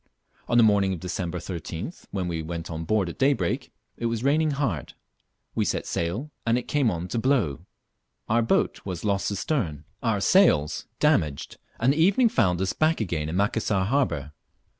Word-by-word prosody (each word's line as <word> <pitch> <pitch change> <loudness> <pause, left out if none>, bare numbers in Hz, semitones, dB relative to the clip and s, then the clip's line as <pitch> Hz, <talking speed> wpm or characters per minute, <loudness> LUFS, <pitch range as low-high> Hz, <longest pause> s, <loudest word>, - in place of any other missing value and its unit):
On 120 - +2
the 120 - +7
morning 100 -3 +3
of 90 - -5
December 90 0 -3
13th, 85 - -6
when 95 -3 -2
we 85 -2 -2
went 85 +1 -5
on 80 0 -4
board 100 +1 +1
at 85 - -7
daybreak, 135 -11 +1 0.3
it 115 - -1
was 115 0 -2
raining 155 +3 +3
hard. 135 - -2 0.6
We - - +1
set - - -1
sail 100 - -2
and 115 +1 +2
it 125 - -4
came 140 -5 +2
on 85 -2 -3
to 115 - -1
blow. 105 - 0 0.6
Our 115 +2 +3
boat 115 - +1
was 90 -1 -5
lost 100 -1 +1
astern, 95 - -2 0.2
our 115 -4 +1
sails 95 - +3
damaged, 75 -3 +1 0.2
and 125 +4 +3
the - - -5
evening 200 +8 +5
found 90 - +2
us 95 - 0
hack 160 +1 +3
again 85 -7 -2
in 80 - -3
Macassar 100 0 +1
harbour. 90 - 0
100 Hz, 180 wpm, -26 LUFS, 85-125 Hz, 0.6 s, the